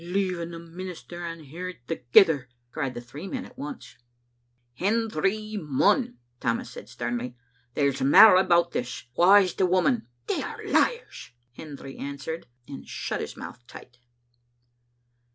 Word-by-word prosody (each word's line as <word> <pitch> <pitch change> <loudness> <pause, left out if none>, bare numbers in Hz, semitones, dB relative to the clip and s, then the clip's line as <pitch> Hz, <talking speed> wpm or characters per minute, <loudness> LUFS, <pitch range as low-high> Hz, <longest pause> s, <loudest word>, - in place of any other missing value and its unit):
"Leaving 180 -1 -1
the 170 - -7
minister 175 +1 -8
and 165 -4 -7
her 180 +4 -6
thegither!" 130 +1 +4 0.2
cried 130 -2 -3
the 120 - -5
three 140 +9 -9
men 260 +5 -4
at - - -15
once. 280 -1 -8 0.8
"Hendry 215 - -1
Munn," 155 - +2 0.2
Tammas 115 +1 -1
said - - -10
sternly, 120 +1 -4 0.4
"there's 140 -2 +1
mair 185 +9 +9
about 170 -2 +4
this; 125 0 -4
wha 185 +4 +6
is 190 -3 +5
the 190 - +2
woman?" 185 - +2 0.2
"They - - -1
are - - -7
liars," 470 - 0 0.2
Hendry 140 -3 -9
answered, 140 +3 -5 0.2
and 140 - -9
shut - - -3
his - - -6
mouth - - -8
tight. 125 - -13
170 Hz, 135 wpm, -26 LUFS, 135-195 Hz, 0.8 s, mair